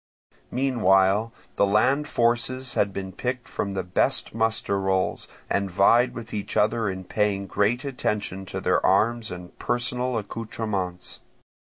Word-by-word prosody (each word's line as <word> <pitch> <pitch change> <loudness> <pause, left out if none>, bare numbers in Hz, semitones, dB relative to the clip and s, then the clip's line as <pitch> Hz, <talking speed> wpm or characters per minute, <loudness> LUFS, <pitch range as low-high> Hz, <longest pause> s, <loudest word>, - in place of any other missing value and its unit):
Meanwhile 110 -5 +3 0.3
the - - +5
land 135 +9 +3
forces 120 +1 +1
had 100 - +1
been 95 -1 -5
picked 125 +4 -3
from 100 - -3
the 95 -1 -2
best 90 0 0
muster 110 -3 0
rolls, 95 -1 0 0.2
and 100 -1 0
vied 110 +7 +4
with 115 -1 -8
each 105 -2 -3
other 110 0 +2
in 95 0 -5
paying 100 +1 0
great 110 +7 0
attention 105 -7 -2
to - - -4
their - - +1
arms 115 0 +2
and 90 0 -9
personal 125 0 -1
accoutrements. 105 -4 -4
105 Hz, 140 wpm, -25 LUFS, 95-120 Hz, 0.3 s, the